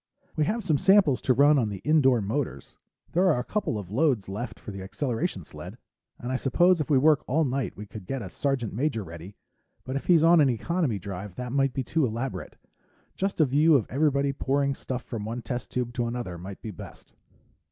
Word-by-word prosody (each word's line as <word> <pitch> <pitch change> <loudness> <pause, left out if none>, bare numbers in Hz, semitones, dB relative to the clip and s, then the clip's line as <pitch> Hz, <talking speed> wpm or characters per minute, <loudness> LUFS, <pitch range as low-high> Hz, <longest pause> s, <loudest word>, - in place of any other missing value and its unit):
"We 155 - +2
have 225 +7 -1
some 155 -7 +1
samples 190 -9 +4
to 130 - +3
run 145 +2 +5
on 110 -4 0
the 100 - -5
indoor 135 -6 +4
motors. 125 +7 -3 0.4
There 185 +2 +3
are 150 - +1
a - - -2
couple 205 - -2
of 100 -3 -7
loads 130 -4 +1
left 105 +6 -5
for - - -8
the 100 -1 -7
acceleration 120 - -3
sled. - - -10 0.4
And 120 - -5
I 130 - +1
suppose 175 +7 +3
if 150 - -4
we 145 - +5
work 150 +2 +4
all 155 +5 +2
night 130 -1 -2
we 105 - -7
could 105 -2 -10
get 135 -3 -3
a 95 - -7
sergeant 135 -6 -1
major 125 -1 -1
ready, 85 +3 -10 0.5
but 130 - -5
if 140 - -3
he's 170 -3 +5
on 165 0 +6
an 140 - +4
economy 135 - -1
drive 95 0 -7
that 125 +1 -5
might 135 -1 +1
be 135 - -1
too 160 +5 0
elaborate. 120 +2 -3 0.6
Just 195 -1 -2
a 155 - +6
view 150 +4 +4
of 125 - +3
everybody 140 0 +1
pouring 140 +1 0
stuff 130 -1 -5
from 115 -4 -5
one 115 +3 -5
test 120 +2 -4
tube 125 -1 -3
to 120 -1 -1
another 115 -8 -5
might 95 +2 -9
be 110 - -5
best." 90 - -12
130 Hz, 215 wpm, -27 LUFS, 110-150 Hz, 0.6 s, on